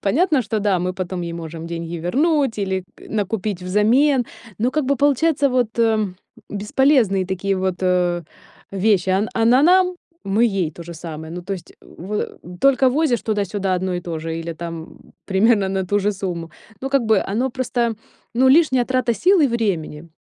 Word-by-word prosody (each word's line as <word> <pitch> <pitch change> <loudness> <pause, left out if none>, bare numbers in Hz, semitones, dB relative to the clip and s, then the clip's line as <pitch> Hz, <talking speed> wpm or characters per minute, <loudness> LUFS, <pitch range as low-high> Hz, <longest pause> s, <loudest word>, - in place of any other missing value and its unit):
Понятно, 290 - +2
что 215 0 -2
да, 200 -3 +2
мы 180 +1 -2
потом 185 -1 -4
ей 170 -1 -4
можем 165 -1 -7
деньги 170 0 -5
вернуть, 275 - +1
или 190 -2 -2
к - - -18
накупить 205 -2 -2
взамен, 240 +8 +3 0.3
но 240 +4 +1
как 305 +1 0
бы 280 - +2
получается 285 +2 +2
вот, 245 -3 -1
э, 225 -1 +3 0.5
бесполезные 210 -2 +2
такие 190 +1 -1
вот, 185 -1 -1
э, 180 -1 +1 0.5
вещи. 195 -2 +2
Он 195 +4 +1
она 235 +4 +4
нам- 365 +2 +4 0.3
мы 205 +4 +2
ей 195 -8 0
то 170 - -10
же 170 +1 -9
самое, 160 -1 -8
ну 175 - -5
то 195 - -5
есть 175 -3 -11
в 200 +5 -6 0.2
только 270 -1 +4
возишь 275 -3 +1
туда-сюда 200 -3 -1
одно 185 0 -2
и 175 - -2
то 165 -2 -5
же, 165 +1 -4
или 165 0 -5
там, 165 0 -6
м, - - -18
примерно 200 0 +3
на 190 -1 -2
ту 205 +3 +1
же 205 +1 +1
сумму, 175 -4 -5 0.3
ну 270 - -3
как 275 -3 +2
бы 220 - +4
оно 230 +7 -1
просто, 240 -2 -1 0.4
ну, 260 +2 +4
лишняя 260 -3 +4
трата 255 -2 0
сил 370 - +3
и 295 - +5
времени. 180 - -2
205 Hz, 185 wpm, -21 LUFS, 180-255 Hz, 0.5 s, и